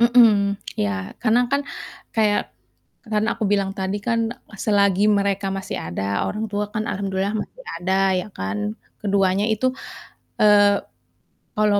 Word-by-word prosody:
Mhm, 225 -4 +5 0.2
ya. 95 -2 -2
Karena 240 0 +3
kan 280 - +3 0.5
kayak 215 -2 +2 0.6
kan 210 0 +2
aku 220 - -3
bilang 195 -1 +1
tadi 190 +2 -1
kan 230 -1 +1 0.3
selagi 200 -2 +3
mereka 200 -1 +1
masih 195 0 -4
ada, 85 +3 -4 0.2
orang 215 +1 -2
tua 205 0 -1
kan 215 -1 -2
alhamdulillah 195 +1 -2
masih - - -14
ada 175 +2 -2 0.3
ya 180 - -7
kan, 100 - -4 0.4
keduanya 195 -1 +2
itu, 220 +4 0 0.7
eee, 205 -1 +6 0.8
kalau 210 -1 +3
205 Hz, 130 wpm, -22 LUFS, 195-215 Hz, 0.8 s, eee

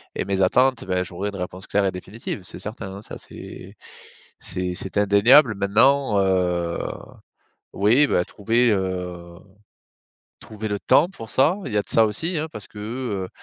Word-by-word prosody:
et - - -1
mes 95 0 -1
attentes. 125 +6 +3
Ben, 90 -1 0
j'aurai 90 +2 -5
une 100 - -8
réponse 90 0 -6
claire 100 - +1
et 95 - +1
définitive, 100 +4 -7
c'est - - -9
certain, 105 -3 -7
hein. 100 - -9
Ça, - - -9
c'est - - -11 0.6
c'est 90 0 -3
c'est 95 +1 -6
indéniable. 105 +6 +6
Maintenant, 110 +5 +3
heu, 90 -3 0 1.0
oui, 115 +9 +4
bah 90 - +1
trouver, 115 +5 +1
heu, 90 -3 -3 1.1
trouver 110 0 -7
le 105 -1 -2
temps 160 - +4
pour 115 - -10
ça, 145 +8 +3
il 125 - -5
y - - -1
a - - +1
de - - -17
ça 115 - +5
aussi, 165 - -2
hein, 155 +1 -3
parce 105 - -8
que, 105 - -13
heu, 105 -4 -4
100 Hz, 175 wpm, -23 LUFS, 95-115 Hz, 1.1 s, indéniable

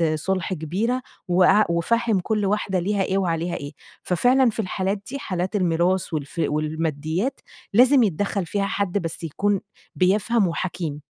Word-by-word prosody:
صُلح 185 +4 -2
كبيرة 195 +11 -1 0.3
وقع 185 +4 +5
وفهّم 220 +5 +1
كل 210 +2 -1
واحدة 195 -1 0
ليها 195 +2 0
إيه 190 - 0
وعليها 170 -2 -1
إيه، 145 +1 -6 0.3
ففعلًا 245 +8 +3
في 225 - -6
الحالات 190 0 -1
دي 280 - -4
حالات 185 -4 -3
الميراث 180 0 +1
والف 155 +2 -3
والماديات 155 - -2 0.3
لازم 255 +4 +6
يتدخّل 200 0 -1
فيها 200 +4 -1
حد 200 -1 -1
بس 170 -3 -4
يكون 165 +5 -2 0.5
بيفهم 205 +3 +2
وحكيم. 165 -3 -3
185 Hz, 140 wpm, -23 LUFS, 170-210 Hz, 0.5 s, لازم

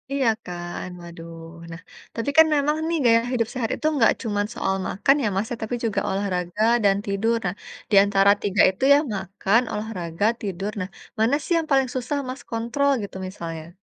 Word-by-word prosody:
Iya 265 -5 +2 0.2
kan, 175 0 -6
waduh. 170 -1 -10 0.4
Nah, 165 0 -9 0.3
tapi 230 +5 -2
kan 320 - +9
memang 295 +2 +1
nih 335 - 0
gaya 230 0 +5
hidup 230 -3 +1
sehat 245 -4 -2
itu - - -8
nggak 235 -5 +5
cuman 205 -2 -1
soal 190 - -1
makan 270 +9 +2
ya, - - +2
Mas, 200 +3 -1
ya, 240 - -3
tapi 220 +3 -2
juga 215 - 0
olahraga 190 0 -2 0.2
dan 195 - +5
tidur. 220 +4 0
Nah, 180 +2 -1 0.4
di - - +4
antara 200 0 +4
3 200 -1 +2
itu 190 +7 -6
ya, - - +7 0.2
makan, 195 +4 +1
olahraga, 200 -4 -3 0.2
tidur. 195 0 -3
Nah, 185 - -4 0.3
mana 230 +6 +3
sih - - -1
yang 325 -1 -1
paling 270 -2 +3
susah 260 +3 -2
Mas, 255 0 -6
kontrol 235 +5 0
gitu, 200 - -8
misalnya? 165 -4 -7
210 Hz, 185 wpm, -23 LUFS, 190-245 Hz, 0.4 s, kan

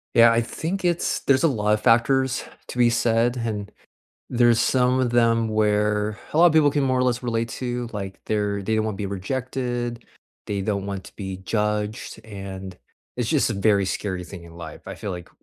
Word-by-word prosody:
Yeah, 115 0 +8
I 115 +1 +3
think 175 - -4
it's 175 -1 +1
there's 135 -1 +3
a 165 - +6
lot 105 -6 +1
of 105 - 0
factors 130 +3 +3 0.2
to - - -8
be 120 -1 +5
said 115 +1 +2
and 105 -3 -3 0.6
there's 120 -2 +4
some 125 +1 +3
of 125 -2 +1
them 115 -1 +3
where 105 -1 +1 0.2
a 155 - +1
lot 175 - +8
of 160 - +2
people 150 -3 +5
can 145 -1 +1
more 130 -1 +2
or 125 - +2
less 125 -1 +1
relate 115 -1 -1
to, 120 +1 -3
like, 95 -2 -5
they're 105 -2 -1
they 110 - -1
don't 110 0 +1
want 110 - -2
to - - -11
be 105 - -3
rejected, 120 +4 -3 0.4
they 100 -1 -2
don't 100 -1 -2
want 100 -1 -4
to - - -14
be 95 -2 -5
judged, 105 +2 -2
and 95 -3 -7 0.4
it's 120 -2 -1
just 140 -6 +2
a - - -2
very 100 -1 +3
scary 95 -1 -3
thing 90 0 -10
in 85 -1 -13
life, 80 -3 -9
I - - -6
feel 105 - -5
like 90 -1 -7
115 Hz, 210 wpm, -24 LUFS, 100-125 Hz, 0.6 s, Yeah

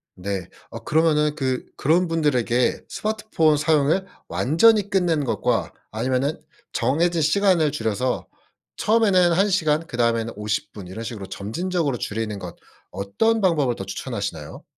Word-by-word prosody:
네. 95 -1 -4 0.2
어 - - -9
그러면은 150 -1 +2
그 130 -3 -2
그런 170 +5 +2
분들에게 125 -7 +1
스마트폰 210 -8 0
사용을 155 +4 +2 0.2
완전히 205 - +3
끝내는 175 -6 +1
것과 120 - -1 0.2
아니면은 130 +6 -1 0.3
정해진 160 +7 +1
시간을 170 -2 +3
줄여서 120 -1 -2 0.5
처음에는 200 -5 +3
1 195 +4 +3
시간 160 -4 +1
그 120 - -7
다음에는 115 -1 +1
50 105 0 -3
분 100 -4 -10
이런 105 +5 -7
식으로 110 -4 -6
점진적으로 140 - -2
줄이는 105 -1 -3
것 90 -2 -8 0.4
어떤 100 - 0
방법을 150 -10 +2
더 95 - -6
추천하시나요? 100 - -5
150 Hz, 320 characters per minute, -23 LUFS, 115-175 Hz, 0.5 s, 완전히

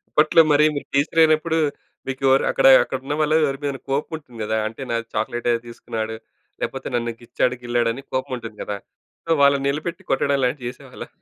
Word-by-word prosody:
అప్పట్లో 155 +2 +5
మరి 150 +1 +5
మీరు 145 - -5
టీచరైనప్పుడు, 160 +2 +3 0.5
మీకు 135 0 -5
ఎవరు 135 +1 +4
అక్కడ-అక్కడ 130 0 +5
ఉన్న 145 - -2
వాళ్ళ 155 0 +2
ఎవరి 135 0 -3
మీద 140 -1 -1
కోపం 140 +4 -1
ఉంటుంది 125 -7 -14
కదా! 110 +1 -1
అంటే 115 +4 -10
నాకు 115 0 -2
చాక్లేట్ 115 +3 -2
ఏదో 115 - 0
తీసుకున్నాడు, 110 -1 -5 0.4
లేకపోతే - - -4
నన్ను 120 -1 -1
గిచ్చాడు, 125 +1 0
గిల్లాడు 120 -1 +1
అని 135 - -9
కోపం 130 0 -2
ఉంటుంది 115 -2 -9
కదా! 105 - -4 0.7
వాళ్ళని 140 -1 +4
నిలబెట్టి 155 +4 -3
కొట్టడం 140 +1 +2
లాంటివి 125 -1 -1
చేసేవాళ్ళా? 125 - -10
135 Hz, 170 wpm, -22 LUFS, 120-145 Hz, 0.7 s, అప్పట్లో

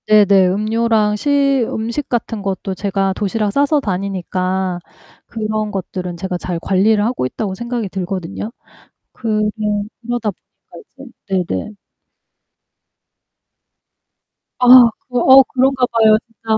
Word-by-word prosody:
네네. 200 -3 +5
음료랑 215 +2 +1
시 275 +1 +1
음식 235 +6 -4
같은 230 -2 -2
것도 195 -1 -3
제가 195 0 -1
도시락 210 0 -1
싸서 285 +5 +2
다니니까 185 -2 -2 0.5
그런 215 -1 -3
것들은 180 -2 -5
제가 185 0 -3
잘 175 -2 -4
관리를 205 +4 +2
하고 240 - -1
있다고 190 - -4
생각이 235 +1 -4
들거든요. 190 +2 -5 0.6
그러 215 -2 -1 0.6
그러다 240 -3 -2 0.7
보니까 270 -2 -12 0.2
이제 190 -2 +1
네네. 95 - -4 2.9
아. 250 - +2 0.4
그 250 - -2
어 265 +2 +7
그런가 260 0 +1
봐요, 220 -2 +4
진짜. 225 -1 -3
215 Hz, 245 characters per minute, -17 LUFS, 190-235 Hz, 2.9 s, 어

